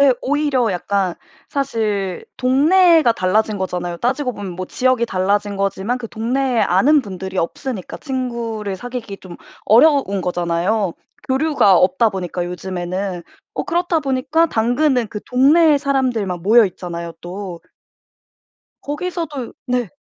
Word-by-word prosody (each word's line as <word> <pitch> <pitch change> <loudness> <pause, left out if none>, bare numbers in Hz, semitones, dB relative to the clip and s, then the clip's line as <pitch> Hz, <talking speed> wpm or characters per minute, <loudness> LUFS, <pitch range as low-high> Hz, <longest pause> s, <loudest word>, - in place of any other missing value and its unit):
예 280 -2 +6
오히려 280 -5 +1
약간 190 0 -1 0.3
사실 215 -9 -2
동네가 315 +3 +4
달라진 210 +2 0
거잖아요. 175 -2 -3
따지고 250 +4 -1
보면 200 -4 -6
뭐 185 +1 -5
지역이 255 0 +1
달라진 200 +1 0
거지만 195 +5 -1
그 235 - -6
동네에 245 +2 -1
아는 260 - +4
분들이 190 -2 -7
없으니까 190 - -3
친구를 235 -7 -4
사귀기 240 -1 -6
좀 180 -3 -11 0.3
어려운 235 -4 +4
거잖아요, 175 +3 0 0.4
교류가 265 - +3
없다 190 +5 +3
보니까 180 -2 -4
요즘에는. 180 +1 -4 0.3
어 - - -2
그렇다 350 -1 0
보니까 290 +4 +1
당근은 245 0 +1
그 210 - -5
동네의 290 +4 +4
사람들만 245 - -1
모여 225 +5 +6
있잖아요, 170 -3 -5
또. 180 -1 -7 1.2
거기서도 295 -4 -4
네. 245 -4 0
225 Hz, 305 characters per minute, -19 LUFS, 190-265 Hz, 1.2 s, 예